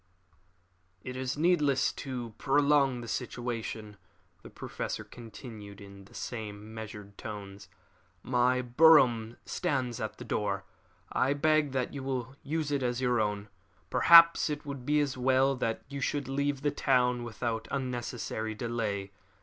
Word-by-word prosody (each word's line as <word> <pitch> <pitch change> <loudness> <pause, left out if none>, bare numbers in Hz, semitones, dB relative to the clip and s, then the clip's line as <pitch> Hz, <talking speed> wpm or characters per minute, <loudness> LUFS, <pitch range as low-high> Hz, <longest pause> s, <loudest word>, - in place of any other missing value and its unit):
"It 125 - -6
is 130 +2 -3
needless 150 -5 +3
to 125 -4 -6
prolong 140 -2 +3
the 120 - -8
situation," 115 -3 -4 0.4
the - - -11
Professor - - -5
continued, 110 -3 -10
in 100 -1 -12
the 120 +4 -18
same 110 -2 -6
measured 105 -2 -9
tones. 100 -2 -8 0.5
"My 125 0 +2
brougham 125 -4 +5
stands 125 -5 -2
at 110 - -4
the - - -8
door. 100 -2 -2 0.5
I 135 +2 +2
beg 155 0 +2
that 130 -2 -1
you 140 - -5
will 130 -1 -3
use 150 +1 -2
it 140 -1 0
as 125 -1 -1
your 125 -3 +2
own. 105 -1 -2 0.4
Perhaps 170 -1 +7
it 150 0 -4
would 140 -3 -7
be 150 0 +3
as 135 -3 -2
well 130 +2 +3
that 115 -2 -2
you 140 0 -6
should 145 0 -1
leave 140 0 -1
the 145 - +2
town 125 -3 +2
without 115 -1 -3
unnecessary 120 -4 -3
delay. 105 -4 -3
125 Hz, 140 wpm, -30 LUFS, 110-140 Hz, 0.5 s, Perhaps